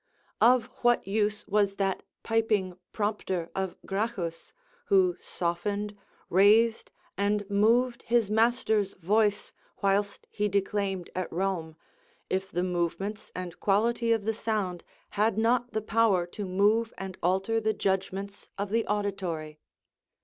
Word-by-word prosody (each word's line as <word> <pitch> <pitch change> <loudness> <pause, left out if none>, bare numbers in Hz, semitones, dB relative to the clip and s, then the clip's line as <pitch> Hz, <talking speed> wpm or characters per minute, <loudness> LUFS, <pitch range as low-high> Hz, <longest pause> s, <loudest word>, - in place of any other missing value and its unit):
Of 245 0 +5 0.2
what 240 0 +3
use 210 +1 0
was 205 -1 +2
that 195 -1 -1 0.2
piping 215 -5 +1 0.2
prompter 205 -5 -2
of 190 -2 -3
Gracchus, 195 -5 -3 0.3
who 185 -3 +4
softened, 200 +4 -2 0.3
raised, 215 +5 +4 0.3
and 205 0 +1
moved 235 +4 +3
his 230 -3 +1
master's 220 -3 +2
voice 205 +3 +1 0.3
whilst 200 +1 +1
he 210 0 0
declaimed 195 -2 -1
at 185 0 -3
Rome, 170 -3 -2 0.6
if 190 +1 -1
the 175 - -1
movements 180 +4 -2
and 180 -1 -6
quality 230 +3 +2
of 225 -2 +2
the 225 - +1
sound 210 -5 -2 0.3
had 210 0 +1
not 240 +2 +2
the 220 - -1
power 215 -5 +3
to 200 +4 -6
move 210 +5 +2
and 190 0 -6
alter 190 +5 +1
the 220 0 +2
judgments 195 +1 -2
of 200 0 -3
the 225 +1 +1
auditory? 185 -7 -3
200 Hz, 125 wpm, -28 LUFS, 190-220 Hz, 0.6 s, Of